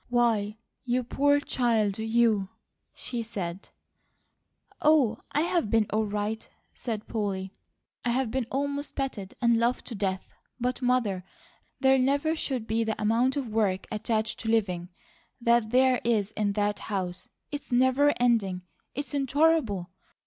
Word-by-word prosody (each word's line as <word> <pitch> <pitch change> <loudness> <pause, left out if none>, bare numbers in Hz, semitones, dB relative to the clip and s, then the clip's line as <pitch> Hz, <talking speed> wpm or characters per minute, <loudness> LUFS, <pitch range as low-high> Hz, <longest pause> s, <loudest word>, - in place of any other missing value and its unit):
"Why, 225 -4 +1 0.3
you 250 0 0
poor 285 +4 +3
child 225 -7 +1
you!" 220 -3 +2 0.4
she 240 -2 -4
said. 195 -5 -5 1.1
"Oh, 280 -8 +4
I've 320 - +1
been 225 0 +3
all 215 0 +1
right," 210 +2 -3 0.2
said 220 -3 -5
Polly. 195 -3 -3 0.5
"I've 245 0 0
been 255 -2 -1
almost 285 +1 -2
petted 235 -9 -4
and 235 -1 +4
loved 240 +2 +1
to - - -6
death; 190 -3 -3 0.3
but 250 +2 -1
Mother, 240 -7 +1 0.6
there 265 -1 +5
never 285 +5 +2
should 260 -7 -2
be 225 +1 0
the 220 -1 -2
amount 235 +6 +2
of 265 -5 -2
work 205 -4 0
attached 220 0 -1
to 225 - -3
living 185 -6 0 0.5
that 235 -2 +3
there 255 +1 +4
is 215 -3 +1
in 210 -2 0
that 205 0 0
house. 185 -3 -3 0.2
It's 290 -2 -6
never 260 +4 +4
ending, 210 -7 +2 0.3
it's 285 +2 -4
intolerable. 275 - +2
230 Hz, 135 wpm, -28 LUFS, 210-260 Hz, 1.1 s, there